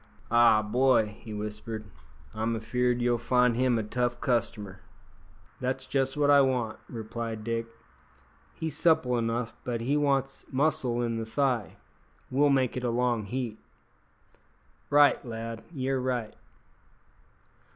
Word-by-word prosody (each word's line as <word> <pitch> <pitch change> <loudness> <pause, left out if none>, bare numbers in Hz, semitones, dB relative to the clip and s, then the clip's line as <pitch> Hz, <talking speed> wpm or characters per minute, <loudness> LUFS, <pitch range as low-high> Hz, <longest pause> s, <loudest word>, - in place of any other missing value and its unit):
"Ah, 115 -2 +6
boy!" 115 -1 +2
he 115 - -10
whispered, 105 +1 -5 0.5
"I'm 110 +1 -1
afeard 125 +2 0
you'll 120 -1 +2
find 125 0 +3
him 125 -1 +2
a 110 - -1
tough 120 +3 -1
customer." 110 -6 -1 0.8
"That's 130 +1 -2
just 135 +1 -1
what 145 -1 +4
I 140 -1 +7
want," 125 -5 0
replied 115 -1 -5
Dick. 115 0 -2 0.9
"He's 160 -2 -4
supple 160 -6 +3
enough, 115 0 -1
but 120 -2 -3
he 135 +5 0
wants 135 -2 0
muscle 130 -4 +1
in 115 -1 -1
the 115 - -3
thigh. 125 -3 0 0.6
We'll 145 +3 +4
make 130 -3 +2
it 125 - -3
a 125 - +1
long 120 -2 0
heat." 120 -1 -4 1.3
"Right, 145 -2 +5
lad, 115 -1 -6
ye're 135 -3 -1
right." 125 -4 -2
120 Hz, 130 wpm, -28 LUFS, 115-130 Hz, 1.3 s, I